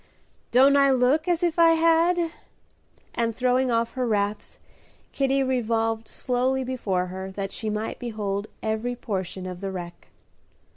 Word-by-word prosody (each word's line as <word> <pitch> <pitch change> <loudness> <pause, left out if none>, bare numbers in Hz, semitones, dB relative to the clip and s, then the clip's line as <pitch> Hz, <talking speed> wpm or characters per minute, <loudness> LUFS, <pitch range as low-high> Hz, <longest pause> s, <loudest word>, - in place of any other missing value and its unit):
"Don't 270 +3 +5
I 280 -1 +5
look 265 +5 +2
as 350 -1 +1
if 345 -1 0
I 330 -1 +7
had?" 330 +1 +3 0.8
and, 230 -1 -1
throwing 255 +1 +2
off 230 0 0
her 255 -1 -1
wraps, 205 -1 -2 0.5
Kitty 275 0 +1
revolved 225 -3 0
slowly 260 +1 -1
before 210 -8 -1
her 190 +1 -6
that 195 0 -5
she 220 - -4
might 215 +1 -3
behold 210 -3 -3 0.2
every 220 +3 -1
portion 190 -5 -4
of 180 0 -7
the 195 - -3
wreck. 175 -2 -8
235 Hz, 145 wpm, -25 LUFS, 205-265 Hz, 0.8 s, I